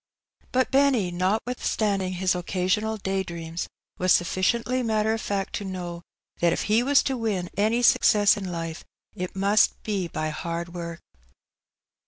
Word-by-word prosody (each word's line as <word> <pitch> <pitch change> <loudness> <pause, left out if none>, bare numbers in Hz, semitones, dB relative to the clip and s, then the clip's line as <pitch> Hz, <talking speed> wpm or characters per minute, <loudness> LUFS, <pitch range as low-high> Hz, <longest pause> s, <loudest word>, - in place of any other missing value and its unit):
Bat 260 0 +1
Behny^ 265 -10 +3
notwithstanding 200 0 0
his 185 0 +1
occasional 185 +5 -1
day 195 -1 -1
dreams^ 170 -1 -5 0.3
was 185 0 +2
sufficiently 230 +9 +2
matter 220 -2 +1
of 225 - -3
fact 195 -1 -2
to - - -6
know 180 -3 -5 0.4
that 170 -1 +3
if - - -1
he 215 +2 +3
was 275 +2 +4
to 265 - -1
win 210 -7 -2
any 220 +4 +1
success 205 -3 +5
in 195 -3 -5
life, 165 -1 -5 0.3
it 180 +1 -5
must 200 +2 +2
be 200 -5 -1
by 155 -1 -3
hard 170 +2 -4
work. 170 -1 -6
195 Hz, 150 wpm, -25 LUFS, 175-220 Hz, 0.4 s, success